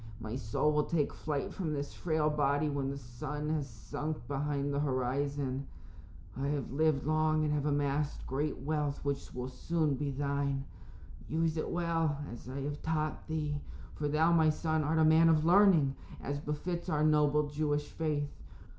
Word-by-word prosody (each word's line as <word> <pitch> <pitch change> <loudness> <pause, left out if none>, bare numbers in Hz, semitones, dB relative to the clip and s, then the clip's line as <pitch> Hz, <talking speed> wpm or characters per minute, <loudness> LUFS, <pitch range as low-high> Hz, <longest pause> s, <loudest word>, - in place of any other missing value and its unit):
My 110 +1 -5
soul 140 +3 +1
will 150 0 +2
take 155 -4 0
flight 150 -3 -3
from 165 -6 -2
this 145 -1 -3
frail 155 -3 0
body 145 0 +2
when 140 -2 -1
the 140 - -4
sun 145 +4 -5
has 150 -3 -1
sunk 155 +5 -4
behind 140 0 -1
the 140 - +1
horizon. 135 0 -1 0.7
I 135 +3 -2
have 140 -5 -2
lived 150 -1 +2
long 155 0 +2
and 150 -1 +1
have 150 0 0
amassed 145 0 0
great 145 +4 -1
wealth 150 -1 -2
which 140 -1 -2
will 125 0 -3
soon 155 +4 0
be 140 +2 -2
thine. 140 0 -1 0.6
Use 160 0 +1
it 155 - -2
well, 165 -3 0 0.2
as 120 +1 -10
I 135 +2 -4
have 145 +1 -4
taught 155 -1 -2
thee, 150 -2 -2 0.3
for 150 - -2
thou, 155 +3 +3
my 160 -2 +5
son, 155 0 0
art 155 +2 +1
a 160 - +5
man 160 +1 +6
of 155 -1 +4
learning, 175 -6 +6 0.3
as 140 +1 -3
befits 170 +5 -3
our 150 -2 +1
noble 150 -1 +4
Jewish 145 0 0
faith. 150 -3 -2
150 Hz, 170 wpm, -32 LUFS, 140-155 Hz, 0.7 s, man